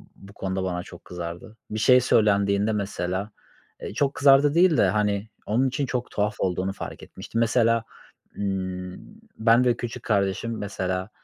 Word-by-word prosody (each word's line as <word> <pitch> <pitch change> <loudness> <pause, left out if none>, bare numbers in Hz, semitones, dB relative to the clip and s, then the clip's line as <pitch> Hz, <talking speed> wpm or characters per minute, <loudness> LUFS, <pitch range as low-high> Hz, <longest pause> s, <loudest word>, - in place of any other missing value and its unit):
bu 100 +1 -15
konuda 95 -1 -3
bana 90 -1 -2
çok 90 -1 -13
kızardı. 90 +5 -7
Bir 110 - -2
şey 125 +4 +6
söylendiğinde 100 -2 +2
mesela, 100 0 -3 0.5
ııı, - - -5
çok 140 +5 0
kızardı 140 -1 +5
değil 175 -2 +5
de, - - +5
hani, 105 +1 0 0.2
onun 125 +5 +1
için 135 +2 -1
çok 125 -1 -3
tuhaf 105 +1 -1
olduğunu 95 +1 -1
fark - - -8
etmiştim. 115 - -6
Mesela, 115 0 +3 0.5
ımm, 95 -2 -3 0.4
ben 115 +2 +4
ve 120 -2 +2
küçük 120 0 -6
kardeşim, 105 +2 0
mesela, 95 -1 -3
105 Hz, 155 wpm, -25 LUFS, 95-115 Hz, 0.5 s, şey